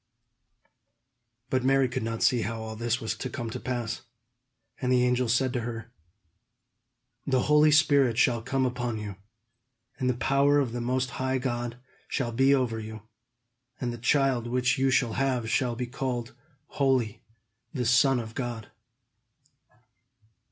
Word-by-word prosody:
But 130 -1 +1
Mary 135 0 +3
could 125 +1 -3
not 115 0 -2
see 125 -4 +3
how 115 +2 -3
all 110 0 -6
this 120 +2 -1
was 110 - -2
to 130 - -4
come 120 -2 -5
to - - -5
pass. 120 -3 -3 0.8
And 125 -1 0
the 125 -1 +4
angel 125 -1 +1
said 125 +2 +2
to 125 - 0
her: 115 -1 -6 1.4
"The 130 -2 +2
Holy 150 +1 +5
Spirit 140 -6 +4
shall 120 -1 +3
come 130 +2 0
upon 120 -2 -2
you, 105 -2 -6 0.8
and 130 -2 +1
the 125 - +1
power 140 +4 +3
of 135 -5 +1
the 120 +1 -4
Most 130 +1 -1
High 130 0 +1
God 120 -2 -3 0.3
shall 120 -4 -2
be 135 +4 +3
over 125 -5 +1
you; 110 -1 -8 0.8
and 120 -2 -2
the 120 - -8
child 130 -1 +2
which 125 +1 +1
you 135 0 +3
shall 125 -3 +2
have 130 -3 0
shall 125 -3 +1
be 125 +1 -3
called 120 -1 -4 0.3
holy, 130 -7 0 0.5
the 125 -6 -2
Son 125 +2 +4
of 110 -1 -7
God." 120 -4 -5
125 Hz, 155 wpm, -27 LUFS, 115-130 Hz, 1.4 s, Holy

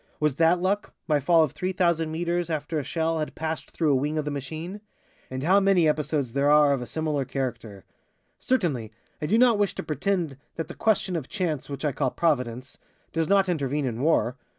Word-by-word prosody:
Was 150 -2 +2
that 165 +2 +4
luck, 195 +3 -1
my 150 -3 +3
fall 165 +4 +4
of 150 - -1
3,000 170 -3 0
meters 170 +1 -1
after 155 0 -2
a - - -3
shell 160 +3 -1
had 155 - -4
passed 160 0 -4
through 160 -3 +1
a - - +4
wing 145 +4 -1
of 155 - -1
the 150 - -2
machine? 160 +8 -6 0.5
And 130 +1 -4
how 190 +5 +5
many 195 -4 +4
episodes 150 -4 0
there 140 +1 +2
are 150 -1 +6
of 135 - -2
a 125 - -6
similar 155 -2 -1
character! 120 -7 -5 0.5
Certainly, 155 - 0 0.3
I 150 - -1
do 215 - +3
not 240 -3 +5
wish 205 -2 +1
to - - -4
pretend 160 -2 -1 0.2
that 165 - -4
the - - -6
question 205 -4 +1
of 155 -6 -4
chance, 165 -10 -2
which 140 +2 -5
I 150 - +2
call 130 - 0
Providence, 125 -5 -1 0.3
does 165 0 0
not 195 -1 +4
intervene 145 -4 -1
in 120 -1 -3
war. 140 -4 +2
155 Hz, 205 wpm, -26 LUFS, 140-175 Hz, 0.5 s, are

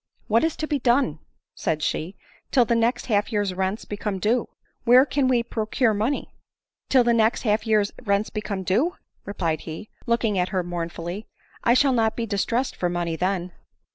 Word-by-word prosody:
u - - -39
What 225 +2 +4
is 325 -1 +1
to 310 - -3
be 295 -2 -1
done," 240 - +2 0.3
said 155 -1 -2
she, 170 +4 -2 0.2
" - - -33
till 250 -3 +5
the 235 - +1
next 230 +2 +1
half 210 -1 +1
year's 205 -3 0
rents 190 +3 -2
become 205 -1 -3
due? 220 +5 +1 0.3
Where 250 +3 +7
can 275 -1 +1
we 245 -2 +3
procure 225 0 0
money 220 +7 -2 0.2
?" - - -68
" - - -61
Till 260 -2 +5
the 240 0 +3
next 225 0 +2
half 215 0 +1
year's 210 -2 +3
rents 200 -2 0
become 210 -3 -3
due 250 - +1
!" - - -46
replied 170 -6 -1
he, 165 +6 -8 0.2
looking 230 -4 +1
at 180 - 0
her 185 -3 -1
mournfully; 175 +3 -5 0.2
" - - -34
I 235 - +4
shall 270 0 +4
not 225 -2 +2
be 235 - -2
distressed 230 +5 -1
for 175 - -1
money 175 -1 -2
then." 180 0 -1
215 Hz, 205 wpm, -24 LUFS, 190-240 Hz, 0.3 s, Where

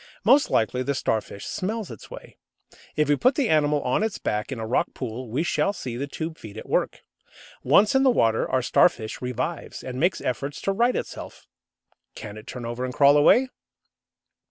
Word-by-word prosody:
Most 285 +1 +5
likely 120 +3 +1
the 140 +2 -1
Starfish 110 -5 -2
smells 215 - -4
its 110 - -11
way. - - -11 0.6
If 150 0 +2
we 145 - +4
put 255 - +2
the 275 -6 +1
animal 150 -2 +2
on 125 +10 0
its 220 -2 -1
back 105 +5 -3
in 130 - -4
a 110 - -4
rock 115 - -1
pool 125 -1 -6
we 135 +8 -1
shall 200 +3 0
see 125 - -6
the 140 +4 -3
tube 160 +3 -6
feet 110 -1 -10
at - - -8
work. - - -1 0.6
Once 200 +11 +4
in 265 - +4
the 270 - +5
water 115 - +2
our 130 -1 +1
Starfish 115 -4 +2
revives, 125 +6 -4
and 130 0 -6
makes 175 +4 +1
efforts 140 +3 -3
to 195 - 0
right 235 +5 +2
itself. - - -6 0.7
Can 105 -1 -8
it 110 - -12
turn 125 -2 -7
over 120 +2 -4
and 130 0 -4
crawl 140 0 +6
away? 245 - +5
140 Hz, 195 wpm, -24 LUFS, 120-180 Hz, 0.7 s, crawl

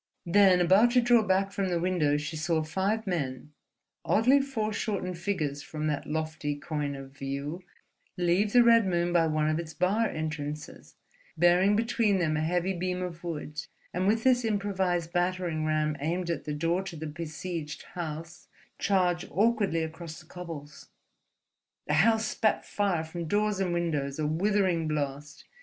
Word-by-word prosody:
Then, 185 +1 +5
about 190 +7 +5
to 255 - +6
draw 240 -1 +5
back 195 -1 +1
from 195 -1 -1
the 175 -1 0
window, 165 -5 +1
she 150 +2 -4
saw 160 +1 0
five 195 +7 -1
men, 150 -6 -3 0.5
oddly 255 +6 +4
foreshortened 215 -8 -2
figures 155 -7 -2
from 155 +1 -5
that 150 -2 -2
lofty 155 -1 -2
coign 145 -1 -3
of 135 0 -9
view, 140 +5 -4 0.6
leave 180 +4 +2
the 245 +1 +6
Red 230 -3 +5
Moon 175 -1 0
by 165 -2 +4
one 155 -1 +1
of 155 +1 +1
its 160 -2 -7
bar 205 +6 +2
entrances, 150 -1 -5 0.4
bearing 180 +4 +4
between 225 -2 +2
them 160 -4 +1
a 150 - 0
heavy 175 +4 0
beam 180 0 -2
of 170 -1 -6
wood, 150 -3 -4 0.3
and 185 +2 0
with 225 +2 +2
this 250 -1 +4
improvised 190 -5 -1
battering 175 -3 0
ram 155 -1 +1
aimed 170 +4 -1
at 170 - -4
the 150 - -3
door 165 +4 0
to 190 -3 -7
the 160 0 -6
besieged 160 0 -5
house, 165 0 -6 0.3
charge 180 -2 +1
awkwardly 205 -6 +2
across 160 0 -7
the - - -15
cobbles. 155 -5 -9 1.0
The 150 - -1
house 220 +8 +4
spat 215 0 0
fire 195 -6 0
from 170 +1 -6
door 210 +5 +1
and 185 -2 0
windows, 150 -5 -1
a 155 - -1
withering 180 0 +1
blast. 145 -1 -4
175 Hz, 160 wpm, -28 LUFS, 155-195 Hz, 1.0 s, to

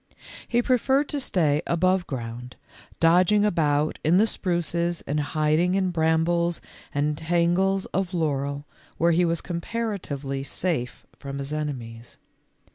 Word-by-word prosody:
He 240 0 +1
preferred 265 +3 +2
to 290 - -2
stay 155 - +1
above 185 +2 +2
ground, 120 -1 -6 0.4
dodging 180 +5 +4
about 155 -6 +1
in 165 +4 +4
the 210 - +5
spruces 175 -4 -2
and 150 +2 -1
hid 155 +1 +1
ing 180 +2 +2
in 190 -2 +1
brambles 170 +1 +1 0.3
and 150 +1 0
tangles 175 +4 +1
of 190 -2 -1
laurel 145 -4 -1 0.3
where 170 +1 +3
he 175 +2 +3
was 165 -1 0
comparatively 170 -8 -4
safe 140 -3 -3
from 140 -1 -6
his 140 +2 -5
enemies. 120 -6 -5
170 Hz, 130 wpm, -25 LUFS, 145-185 Hz, 0.4 s, the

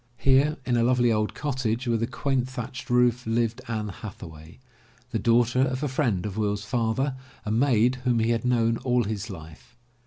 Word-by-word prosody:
Here 140 +3 +3
in 125 -1 +1
a 115 - +3
lovely 120 -1 +3
old 110 -1 -1
cottage, 130 -4 -2
with 115 -2 0
a 115 - 0
quaint 135 -2 -1
thatched 125 0 -7
roof, 125 -1 +2
lived 115 +1 0
Anne 110 -2 -3
Hathaway, 85 -5 -10 0.5
the 115 - -1
daughter 120 +2 +3
of 130 +1 0
a - - +1
friend 125 - 0
of 105 0 -5
Will's 105 -1 -1
father, 120 +4 0 0.3
a 105 - -2
maid 120 +1 +3
whom 125 -2 +2
he 115 +1 +2
had 115 +1 0
known 115 -2 +2
all 125 -1 +1
his 105 +1 -4
life. 80 +5 -11
120 Hz, 185 wpm, -26 LUFS, 110-125 Hz, 0.5 s, Here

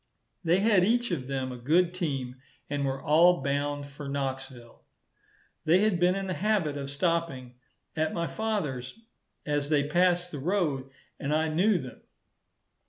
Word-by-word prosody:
They 175 +3 +3
had 205 -4 +4
each 240 +2 +2
of 135 -7 -3
them 130 -1 -2
a 125 - -7
good 170 +8 +2
team, 135 -8 -3 0.3
and 145 -1 -1
were 135 0 -2
all 165 +1 +5
bound 145 +1 -1
for 140 0 -8
Knoxville. 135 -3 -5 0.8
They 170 +4 +4
had 210 -5 +2
been 180 +1 +3
in 195 0 -3
the 185 - -2
habit 190 -7 0
of 140 -1 -5
stopping 145 -5 -1 0.4
at 155 0 0
my 170 -1 -2
father's 155 - -3 0.5
as 145 -1 -1
they 145 -2 +2
passed 175 +2 +2
the 145 - -5
road, 150 -5 -1 0.3
and 140 - -3
I 160 +1 +1
knew 185 +6 +3
them. 130 -6 -8
155 Hz, 160 wpm, -28 LUFS, 135-180 Hz, 0.8 s, all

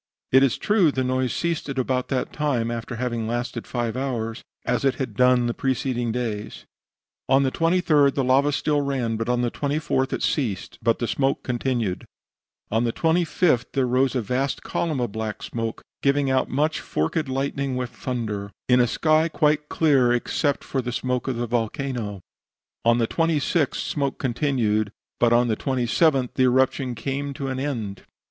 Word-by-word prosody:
It 130 - +7
is 135 -3 +3
true 200 -7 +3
the 130 -1 -1
noise 130 0 0
ceased 170 -3 -2
about 130 -1 -1
that 130 -2 -2
time 130 -6 0
after 120 +1 -4
having 120 -2 -2
lasted 120 0 -3
five 120 -2 -2
hours, 120 -4 -3 0.2
as 125 +2 0
it 135 -2 +2
had 130 -5 -4
done 125 -1 +4
the 120 - 0
preceding 125 -2 -1
days. 110 -3 -4 0.6
"On 135 +1 +5
the 130 - +1
23d 165 -4 +3
the 135 - +1
lava 135 +3 +3
still 145 0 +1
ran, 130 -5 -1
but 115 +1 -3
on 125 0 +1
the 120 - 0
24th 145 -2 -1
it - - -2
ceased; 115 - -1
but 115 +1 +1
smoke 135 +2 0
continued. 120 -6 -1 0.7
On 110 +2 +2
the 120 - +1
25th 160 -4 +1
there 135 -2 +2
rose 130 +2 +2
a 125 - 0
vast 130 +6 -1
column 155 -5 -1
of 120 -4 -1
black 110 0 -4
smoke, 115 -1 -4 0.2
giving 140 -1 +2
out 130 - +1
much 150 +4 0
forked 135 - -1
lightning 135 0 -1
with 125 -1 -3
thunder, 110 -5 -4 0.2
in 125 0 +5
a 120 - +4
sky 155 +6 +2
quite 150 -2 +1
clear 135 -6 +3
except 140 +4 0
for 135 - -2
the 125 0 -4
smoke 125 +1 -2
of 130 - -1
the 120 +1 -1
volcano. 115 - -2 0.6
On 115 0 +4
the 115 - +2
26th 165 -1 +1
smoke 140 -2 -2
continued, 120 -6 0 0.3
but 120 -1 +4
on 120 +1 +4
the 110 - +1
27th 130 +2 +1
the 130 - +2
eruption 130 0 +2
came 140 +4 -3
to 140 -3 -3
an 130 0 -3
end." 115 -9 -3
130 Hz, 175 wpm, -24 LUFS, 120-140 Hz, 0.7 s, It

